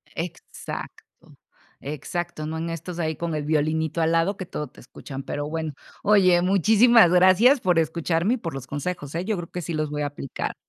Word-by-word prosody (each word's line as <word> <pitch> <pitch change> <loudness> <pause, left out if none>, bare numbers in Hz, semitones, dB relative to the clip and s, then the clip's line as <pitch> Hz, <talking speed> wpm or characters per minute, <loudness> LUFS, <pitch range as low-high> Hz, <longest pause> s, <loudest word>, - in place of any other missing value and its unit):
Exacto. 170 +1 -7 0.8
Exacto, 155 +3 -4
no 160 +1 -4
en 165 +1 -3
estos 165 +2 -6
ahí 160 -2 -1
con 170 -2 -3
el 150 - -2
violinito 160 +1 0
al 160 - +2
lado 165 +4 +2
que 185 - -5
todo 150 - -4
te - - -19
escuchan, 135 +2 -9
pero 145 0 -4
bueno. 160 -2 -3 0.3
Oye, 185 -4 +5
muchísimas 210 +2 +5
gracias 185 +9 +6
por 180 -3 +2
escucharme 165 +5 0
y - - -5
por 165 -8 -5
los 135 -1 -6
consejos, 145 0 -4
¿eh? 175 - -2
Yo 215 -2 -1
creo 170 -1 -6
que 180 - -4
sí 170 0 -4
los 155 -1 -1
voy 150 0 -3
a 145 - 0
aplicar. 140 -2 -5
165 Hz, 195 wpm, -24 LUFS, 155-180 Hz, 0.8 s, gracias